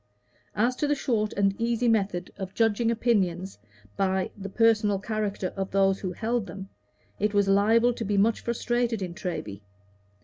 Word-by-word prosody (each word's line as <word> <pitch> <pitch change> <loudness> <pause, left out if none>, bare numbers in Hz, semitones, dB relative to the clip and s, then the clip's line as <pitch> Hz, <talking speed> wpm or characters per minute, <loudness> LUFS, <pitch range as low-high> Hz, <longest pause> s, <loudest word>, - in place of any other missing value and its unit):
As 235 +6 +2
to 295 - 0
the 290 - +2
short 225 -7 0
and 195 -1 +2
easy 235 +1 +1
method 195 -5 0
of 190 0 -7
judging 225 0 +2
opinions 195 - 0 0.4
by 190 - 0
the 195 -1 -7
personal 215 -1 +3
character 205 -2 -3
of 195 0 -3
those 195 0 +2
who 185 - -3
held 230 +1 -2
them, 195 -1 -8 0.5
it 210 0 0
was 200 -1 +3
liable 225 +5 +4
to 230 - -5
be 205 -1 -1
much 215 +3 +3
frustrated 235 -2 -1
in 175 -2 -5
Treby. 165 - -5
205 Hz, 165 wpm, -26 LUFS, 195-230 Hz, 0.5 s, liable